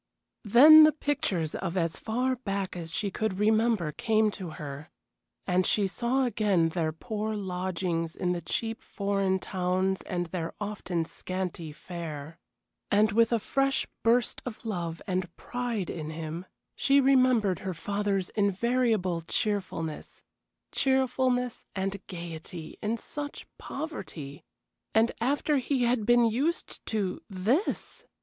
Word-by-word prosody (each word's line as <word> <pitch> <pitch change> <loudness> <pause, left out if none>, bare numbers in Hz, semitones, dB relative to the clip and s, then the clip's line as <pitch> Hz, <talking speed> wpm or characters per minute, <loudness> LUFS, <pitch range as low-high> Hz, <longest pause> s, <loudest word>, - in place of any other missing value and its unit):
Then 300 +9 +10
the 310 0 +6
pictures 285 - -1
of 180 0 -3
as 165 -2 0
far 250 +4 0
back 200 -6 -3
as 165 -2 -6
she 205 -2 -1
could 215 -1 -1
remember 215 -5 +2
came 215 +5 +2
to 185 -3 -6
her, 145 0 -7 0.6
and 180 +1 +2
she 205 +2 +2
saw 245 +7 +1
again 200 -8 +2
their 160 -1 -1
poor 215 +6 -3
lodgings 180 -3 -2
in 180 - 0
the 175 -1 -2
cheap 225 +4 -2
foreign 195 -1 0
towns 185 0 0
and 175 -1 -2
their 165 -1 -4
often 190 -5 -2
scanty 180 -2 -5
fare. 160 -1 -7 0.5
And 215 +2 +4
with 230 +2 +4
a 235 - +4
fresh 275 +5 +1 0.2
burst 235 +1 +2
of 240 -2 -7
love 170 -6 -3
and 185 -3 -2
pride 240 -6 -3
in 155 -2 -5
him, 165 +3 -5 0.3
she 280 0 +4
remembered 255 - +4
her 185 -2 -4
father's 200 +1 -1
invariable 205 -3 +1
cheerfulness 165 -4 -3 0.5
cheerfulness 255 -2 +1
and 195 0 -2
gayety 170 -1 -7
in 220 +2 0
such 290 +5 -6
poverty! 160 - -6 0.5
And 225 +2 +5
after 285 +4 +2
he 260 0 0
had 235 -3 +1
been 240 0 +6
used 275 +10 -1
to 200 -4 -1
this! 215 - -1
200 Hz, 130 wpm, -28 LUFS, 175-235 Hz, 0.6 s, Then